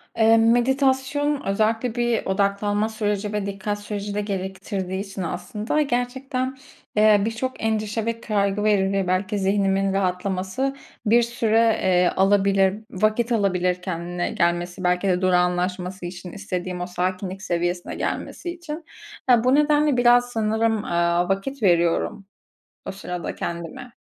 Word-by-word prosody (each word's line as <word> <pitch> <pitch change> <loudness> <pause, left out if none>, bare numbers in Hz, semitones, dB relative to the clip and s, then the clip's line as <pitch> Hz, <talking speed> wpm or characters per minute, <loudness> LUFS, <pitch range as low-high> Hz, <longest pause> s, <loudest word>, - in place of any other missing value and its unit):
Eee, 225 0 +5
meditasyon 265 +4 +2
özellikle 220 +4 0
bir 240 -1 0
odaklanma 205 +2 0
süreci 210 -1 -2
ve 210 -1 -1
dikkat 200 +1 -3
süreci 205 0 -5
de 210 - -1
gerektirdiği 190 -1 -4
için 195 -1 -6
aslında 210 - -2
gerçekten, 260 0 -2 0.4
eee, 210 -1 +5
birçok 230 +3 -3
endişe 220 0 -1
ve 230 0 -3
kaygı 200 -1 0
veri 195 -2 +2
belki 190 +3 0
zihnimin 195 0 +1
rahatlaması 190 +7 -1 0.3
bir 230 +3 +5
süre, 230 -1 +2
eee, 180 -1 +4
alabilir, 195 0 +3 0.2
vakit 215 +5 +1
alabilir 180 -4 +1
kendine 175 0 -3
gelmesi 175 +1 -1
belki 180 +2 +1
de 180 -1 +1
durağanlaşması 180 0 0
için 180 0 -7
istediğim 180 -3 -4
o 180 - -3
sakinlik 185 +1 -3
seviyesine 175 -2 -2
gelmesi 350 - -4
için. 335 -2 -8 0.4
Eee, 240 -2 +6
bu 255 +2 +4
nedenle 295 -2 +3
biraz 245 0 +5
sanırım, 220 -1 0
eee, 170 0 +1
vakit 250 +5 -7
veriyorum 175 +2 +2 0.6
o - - -3
sırada 180 -3 -5
kendime. 170 +9 -6
205 Hz, 130 wpm, -23 LUFS, 185-230 Hz, 0.6 s, Eee